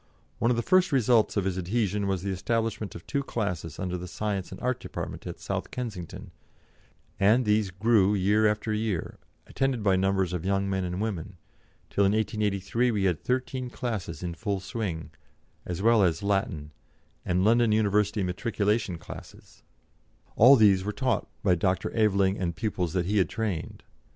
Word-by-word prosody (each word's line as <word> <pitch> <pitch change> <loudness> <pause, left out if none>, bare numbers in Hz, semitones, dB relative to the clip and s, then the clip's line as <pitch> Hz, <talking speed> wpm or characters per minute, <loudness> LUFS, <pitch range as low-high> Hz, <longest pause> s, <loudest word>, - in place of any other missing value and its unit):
One 115 - +2
of 120 - +2
the 120 - 0
first 185 -1 +3
results 120 -5 +3
of 100 - +1
his 95 -1 -1
adhesion 100 +1 -1
was 95 -2 -1
the 100 - -2
establishment 110 +1 -2
of 85 - -10
two 140 - -1
classes 90 - -3
under 90 -1 -3
the 90 - -6
Science 100 0 -3
and 95 - -8
Art 125 0 -1
Department - - -6
at - - -7
South - - -4
Kensington, 105 -9 -6 0.9
and 110 +6 +4
these 105 -1 +2
grew 105 +1 +3
year 105 +3 +3
after 105 +1 -1
year, 105 -5 -2 0.3
attended 135 -5 -1
by 95 -2 +4
numbers 95 -1 +1
of 90 -2 -3
young 100 +1 0
men 95 -1 -1
and 90 +2 -3
women, 95 -4 -4 0.5
till 100 - +2
in 100 +1 +3
1883 105 +2 0
we 105 -4 0
had 90 -6 +1
thirteen 130 0 -2
classes 105 -10 -4
in 85 -1 -3
full 100 +2 -2
swing, 95 -4 -4 0.6
as 90 +2 -4
well 115 -1 +5
as 85 -1 +1
Latin, 95 -7 -1 0.5
and 90 +2 +1
London 115 0 +4
University 105 -1 +2
Matriculation 105 0 -1
classes; - - -12 0.7
all 125 +5 +8
these 100 -6 +5
were 105 - -2
taught 125 -1 -1 0.2
by 95 -3 +4
Dr. 90 +2 0
Aveling 100 -3 +2
and 85 -2 -2
pupils 90 -4 -2
that 90 -2 0
he 105 +3 +1
had 95 - +2
trained. 105 -8 -4
100 Hz, 170 wpm, -27 LUFS, 95-110 Hz, 0.9 s, all